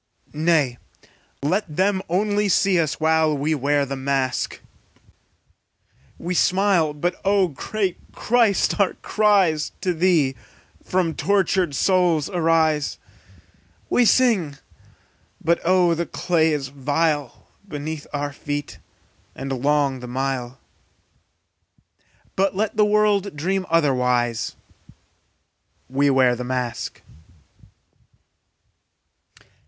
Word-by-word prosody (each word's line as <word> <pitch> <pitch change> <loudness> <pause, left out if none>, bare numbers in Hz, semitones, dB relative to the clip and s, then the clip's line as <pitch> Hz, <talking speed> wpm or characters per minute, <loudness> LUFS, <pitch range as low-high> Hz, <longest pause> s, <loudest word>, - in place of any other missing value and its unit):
Nay, 150 -5 +1 0.6
let 175 +1 -1
them 190 0 +2
only 205 +3 +1
see 190 -1 +3
us, 155 -4 -1
while 160 -1 +2
We 150 +3 0
wear 145 0 +1
the 135 0 -5
mask. 135 -1 -2 1.6
We 175 +2 -4
smile, 185 -3 +2
but, 175 +4 -2
O 195 -2 +2
great 185 +6 -3
Christ, 230 -4 +1
our 200 - +2
cries 195 -8 +2
To 180 - 0
thee 160 -6 +2 0.5
from 180 -3 0
tortured 190 -5 +1
souls 180 -2 +2
arise. 160 -4 +1 0.9
We 245 - +4
sing, 210 - +2 0.8
but 170 +1 +1
oh 180 -1 +3
the 170 +1 -2
clay 160 -3 +1
is 140 -3 -2
vile 145 0 -2 0.2
Beneath 150 -2 -6
our 145 -1 -3
feet, 145 0 -5 0.6
and 135 0 -5
long 140 -2 +1
the 125 - -8
mile; 130 0 -3 1.8
But 195 0 +1
let 215 +2 -1
the 210 0 +4
world 205 -3 +1
dream 185 +5 -2
otherwise, 125 -7 +1 1.3
We 140 +2 +1
wear 130 -2 +3
the 125 - -5
mask! 125 -1 -4
160 Hz, 100 wpm, -22 LUFS, 140-190 Hz, 1.8 s, We